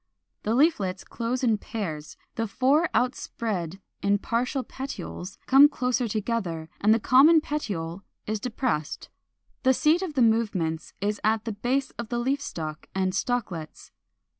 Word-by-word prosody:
The 220 +2 0
leaflets 210 - +2
close 245 +2 -3
in 225 -4 +3
pairs, 160 -11 -5 0.2
the 225 0 -2
four 275 - +2
outspread 210 -8 -2 0.4
partial 250 +3 0
petioles 255 -9 -7
come 275 +2 +8
closer 250 -3 0
together, 200 -7 -2
and 210 - +4
the 225 - +5
common 275 +8 +6
petiole 195 - -4 0.2
is 215 0 -2
depressed. 225 - -2 0.5
The 260 -1 +4
seat 315 +7 +3
of 350 -6 -4
the 255 - +4
movements 200 -8 0
is 205 +1 -1
at 220 +1 +1
the 225 - -2
base 255 +6 -1
of 235 -2 -4
the 240 - -1
leaf 265 +4 0
stalk 155 - -6
and 190 -1 +1
stalklets. 195 -9 -3
230 Hz, 140 wpm, -26 LUFS, 195-260 Hz, 0.5 s, come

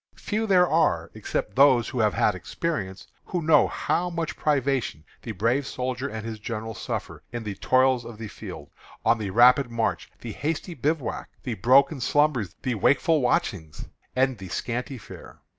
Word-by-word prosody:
Few 220 +1 -2
there 180 -3 +5
are, 120 - +1
except - - -4
those 130 -3 +5
who 125 - -4
have 105 -2 +2
had - - +3
experience, 100 - -4 0.2
who 175 -2 -3
know 155 -1 +5
how 180 +1 -1
much 170 -2 -3
privation 135 - 0 0.2
the 115 - -5
brave 115 +7 0
soldier 130 +1 -3
and 110 -3 -6
his 110 -1 -5
general 110 +1 -5
suffer - - -5
in 120 -1 -5
the 105 -2 -4
toils 130 +4 +2
of 115 -2 -9
the 110 0 -6
field, - - -9 0.3
on 115 - +4
the 105 -2 -3
rapid 125 +5 +5
march, 115 -1 -2
the 115 - -6
hasty 160 - -3
bivouac, 150 -1 -2
the - - -3
broken 135 - +4
slumbers, 135 - +1
the 125 - 0
wakeful 145 - +3
watchings, 85 -10 -1 0.3
and 130 -3 +1
the 95 -1 -8
scanty 125 +7 -3
fare." 105 - -12
125 Hz, 170 wpm, -25 LUFS, 110-145 Hz, 0.3 s, there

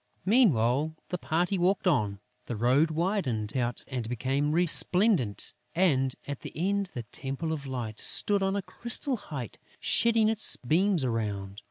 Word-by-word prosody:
Meanwhile, 155 - +3
the 180 - -3
party 175 +5 0
walked 190 +3 +1
on, 105 - +1 0.3
the 120 - -3
road 130 +8 +3
widened 155 - -1
out 120 -2 -2
and 125 -4 -4
became 135 +5 -1
resplendent; 175 - +3 0.2
and, 135 -8 +2
at 145 -2 -4
the - - -8
end, 195 +3 -1
the 120 - -4
Temple 135 +8 -4
of 140 -3 -6
Light 120 -5 -5
stood 205 -1 +2
on 195 0 0
a 200 - -2
crystal 240 +6 -1
height, 140 - -7 0.2
shedding 230 -2 +2
its 220 -1 +3
beams 175 +5 +1
around. 105 -5 -3
150 Hz, 150 wpm, -28 LUFS, 120-190 Hz, 0.3 s, Meanwhile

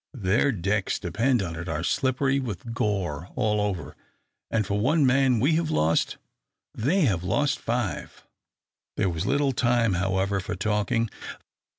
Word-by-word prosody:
Their 110 +5 +2
decks, 100 -1 -1
depend 115 +5 0
upon 85 -3 -4
it, 85 +2 -6
are 80 +1 -2
slippery 135 +3 +1
with 115 -2 -5
gore 95 -7 -2
all 105 -4 +1
over, 95 -8 -3 0.5
and 110 -2 0
for 100 +2 -1
one 145 +7 +3
man 130 -2 +3
we 140 +8 +3
have 165 -2 -1
lost, 80 - +1 0.6
they 155 - +1
have 100 - +1
lost 145 - +1
five." 120 -4 -3 0.7
There 95 - +2
was 80 -2 -3
little 140 -1 +2
time, 120 -3 +2
however, 95 +2 0
for 90 - -4
talking. 105 +4 0
105 Hz, 150 wpm, -26 LUFS, 95-130 Hz, 0.7 s, one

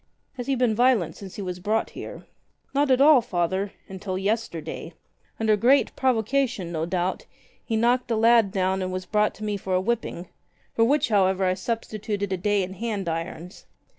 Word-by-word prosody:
"Has 245 -2 -6
he 275 - +1
been 245 -3 +2
violent 220 -9 +2
since 195 -2 -10
he 205 - -5
was 180 -1 -5
brought 215 +4 -1
here?" - - -9 0.5
"Not 285 0 +2
at 260 0 +4
all. 290 -3 +7
Father 190 -2 -1
— - - -37
until 190 0 -5
yesterday. 200 -4 -3 0.5
Under 220 -1 +3
great 250 +7 +3
pro 260 -1 +3
vocation, 230 -4 -1
no 160 -1 -2
doubt, 180 +1 -2 0.4
he 225 - -2
knocked 245 +2 +2
a 230 - +1
lad 225 -1 +5
down 190 -1 0
and 185 0 -2
was 185 0 -4
brought 210 0 +1
to 215 - -9
me 210 -1 -1
for 190 -1 -2
a - - +3
whipping 200 -4 -2 0.2
— - - -39
for 230 - +3
which 285 +1 +2
however 190 -2 +3
I 185 - +2
substituted 205 -1 -3
a - - -1
day 205 +2 +1
in 185 +1 -6
hand 205 -2 -3
irons. 165 +2 -5
205 Hz, 195 wpm, -25 LUFS, 185-235 Hz, 0.5 s, all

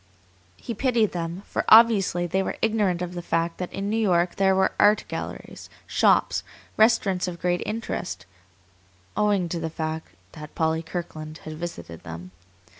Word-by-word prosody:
He 235 - -5
pitied 230 -2 +1
them, 170 +2 -4
for - - -2
obviously 215 -6 +6
they 190 +2 0
were - - -3
ignorant 205 -6 +1
of 180 0 -5
the 175 - -5
fact 165 0 -1
that 180 - -4
in 195 +1 -4
New 220 +2 0
York 175 -4 +2
there 190 -1 +3
were 190 0 +3
art 210 +1 +5
galleries, - - -7 0.2
shops, - - +2 0.3
restaurants 215 -5 +3
of 175 -1 -5
great 175 0 0
interest, 210 - -4 0.9
owing 205 -4 +2
to 170 - -3
the 165 0 -3
fact 160 0 -4 0.2
that 150 0 -11
Polly 160 0 +1
Kirkland 160 -2 -6
had 155 - -6
visited 155 - -7
them. 85 +2 -9
175 Hz, 160 wpm, -25 LUFS, 160-205 Hz, 0.9 s, obviously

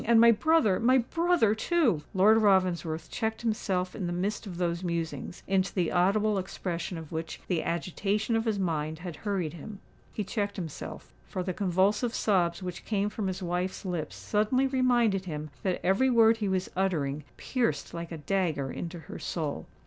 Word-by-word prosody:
And 230 0 +5
my 235 0 +8
brother—my 245 - +4
brother 330 -2 +2
too——" 235 - +2
Lord 215 +4 +6
Ravensworth 180 -5 +2
checked 220 0 -2
himself 195 -5 -1
in 190 -5 -3
the - - -2
midst 200 +5 -2
of 180 -3 -7
those 170 0 -1
musings, 170 0 -3
into 195 0 +1
the 180 -4 +1
audible 200 +3 +2
expression 180 -1 -4
of 160 -2 -9
which 160 0 -4
the 175 -4 +1
agitation 200 +6 -1
of 225 0 +1
his 220 -3 +1
mind 160 -4 -1
had 170 -1 -7
hurried 185 -6 -2
him:—he 200 +4 -8
checked 200 0 -2
himself, 165 - -7
for 185 - -3
the 185 0 -2
convulsive 200 +6 +1
sobs 180 -3 +1
which 180 -1 -5
came 205 -1 0
from 210 -2 -3
his 185 0 -3
wife's 180 +3 -2
lips 170 -5 -3
suddenly 220 +6 +1
reminded 240 -7 +2
him 155 -3 -5
that 185 -2 0
every 195 +9 +3
word 230 -2 +5
he 210 -3 -1
was 190 -1 0
uttering 155 -7 0
pierced 250 -3 -1
like 170 0 -6
a 165 - -4
dagger 155 -5 -1
into 170 0 -5
her 145 - -9
soul. 155 -4 -3
190 Hz, 170 wpm, -29 LUFS, 170-220 Hz, -, my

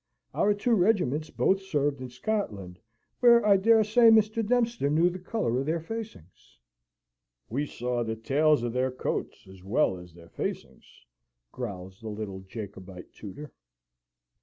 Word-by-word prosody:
Our 205 0 +2
two 235 +4 0
regiments 175 - +1
both 195 +1 +1
served 145 -7 -1
in 130 - -6
Scotland, 115 - -4 0.4
where 235 -2 +6
I 205 -1 +6
dare 220 +3 +4
say 225 +2 +5
Mr. 220 0 +4
Dempster 235 - +1
knew 165 +4 +3
the 180 - -7
colour 130 - -1
of 135 - -3
their 165 +2 0
facings." 185 - -9 0.9
"We 140 +6 -2
saw 125 -1 -3
the 110 -1 -3
tails 145 +4 +2
of 120 -1 -2
their 130 +1 +1
coats, 130 - -4
as 95 -1 -14
well 95 -1 +1
as 90 -2 -14
their 85 -1 -15
facings," - - -7 0.5
growls 95 -6 -7
the 110 - -6
little 105 -2 -6
Jacobite 95 -2 -10
tutor. 125 +7 -10
140 Hz, 150 wpm, -27 LUFS, -, 0.9 s, where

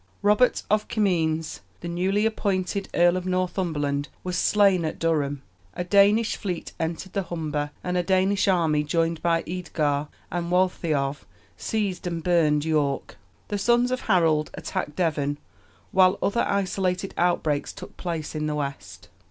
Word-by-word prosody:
Robert 210 +5 +3
of 215 0 +1
Comines, 165 -7 0 0.2
the 170 - -5
newly 190 +5 0
appointed 200 -3 -1
Earl 175 +1 +4
of 185 0 -4
Northumberland, 170 -6 -1 0.2
was 180 -1 -3
slain 195 -1 +3
at 155 - -3
Durham; 145 -4 0 0.3
a - - -2
Danish 205 +4 +4
fleet 180 -4 -4
entered 170 +3 -3
the 200 - 0
Humber, 155 -4 -3
and 180 0 -2
a 180 - +3
Danish 190 +2 +2
army, 160 -5 +2
joined 165 +1 0
by 165 -1 +1
Eadgar 155 -5 -1 0.2
and 170 0 -2
Waltheof, 155 -6 0 0.3
seized 200 -5 -2
and 170 -2 -3
burned 155 -4 +3
York. 150 -3 -1 0.3
The 205 - -2
sons 240 +4 +3
of 255 0 -1
Harold 165 -6 +2
attacked 150 - -4
Devon, 145 -5 0 0.5
while 185 0 +5
other 235 +4 +1
isolated 190 -1 -1
outbreaks 160 -4 0
took - - -11
place 165 -4 -4
in 155 -1 -2
the 150 - -1
west. 140 -2 -5
175 Hz, 145 wpm, -25 LUFS, 155-190 Hz, 0.5 s, while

